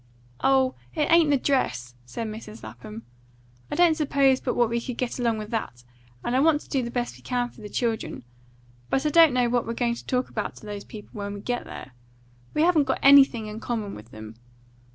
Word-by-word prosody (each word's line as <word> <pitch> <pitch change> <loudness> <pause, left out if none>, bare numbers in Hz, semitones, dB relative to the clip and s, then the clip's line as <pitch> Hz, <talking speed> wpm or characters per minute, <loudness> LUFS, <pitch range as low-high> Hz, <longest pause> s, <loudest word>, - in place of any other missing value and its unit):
"Oh, 265 -1 +3 0.2
it 300 -2 0
ain't 335 -2 +6
the 285 - +4
dress!" 125 - -1
said 225 - -5
Mrs. 215 0 -8
Lapham. 110 0 -9 0.7
"I - - -3
don't 345 -2 +5
suppose 275 -4 +2
but 250 - -2
what 240 -1 +3
we 235 +1 -1
could 250 -1 -6
get 250 0 -3
along 230 -2 +1
with 215 +1 -7
that; 125 - -4 0.4
and 240 - 0
I - - +4
want 300 +1 +3
to - - -17
do 270 - 0
the 235 - -4
best 245 0 -3
we - - -18
can 245 -1 -1
for - - -16
the 210 - -8
children; 225 - -2 0.7
but 270 - 0
I - - +3
don't 325 0 +7
know 250 -1 +2
what 240 -1 0
we're 230 - -3
going 235 0 0
to 235 - -9
talk 250 0 0
about 215 - -4
to - - -13
those 205 -1 -6
people 210 -2 -11
when 205 -1 -5
we - - -7
get 245 +4 -3
there. - - -9 0.6
We 305 - +3
haven't 330 -4 +4
got 265 - 0
anything 270 -5 +6
in 215 +1 -6
common 220 -4 -3
with 105 +2 -11
them. 110 0 -11
240 Hz, 225 wpm, -25 LUFS, 215-270 Hz, 0.7 s, don't